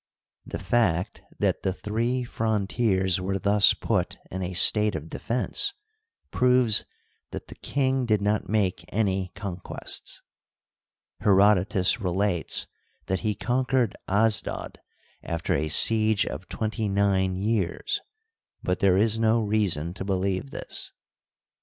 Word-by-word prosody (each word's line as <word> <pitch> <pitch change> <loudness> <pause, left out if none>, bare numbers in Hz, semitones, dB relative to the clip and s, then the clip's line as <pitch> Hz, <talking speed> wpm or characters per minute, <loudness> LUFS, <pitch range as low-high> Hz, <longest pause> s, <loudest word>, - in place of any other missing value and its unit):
The - - -4
fact 95 -7 0 0.2
that - - 0
the 95 - -1
three 115 +6 -2
frontiers 100 -4 0
were 95 +1 -1
thus 100 +1 +4
put - - -1
in 95 - -4
a 90 0 -3
state 105 +2 +4
of 80 +1 -7
defense 260 - 0 0.6
proves 125 -3 +3 0.4
that - - -8
the - - -8
king 130 -2 -1
did 105 -2 +2
not 105 +1 -1
make 95 -5 0
any 95 -3 0
con 95 -2 -5
quests. 90 - -4 1.0
Herodotus 100 +1 +3
relates 90 -2 0 0.4
that 95 - -1
he 110 -2 -1
conquered 125 0 0
Asdod 105 +2 +1 0.5
sifter 85 0 -2
a 80 - -1
siege 110 +4 +4
of 75 +8 -7
twenty 110 -1 -2
nine 95 -1 +1
years, 110 - -1 0.6
but 90 - -1
there 95 -2 +4
is 110 +2 +2
no 115 +1 +3
reason 100 -6 0
to 95 - -6
believe 95 -4 -1
this. - - -6
100 Hz, 125 wpm, -26 LUFS, 95-110 Hz, 1.0 s, thus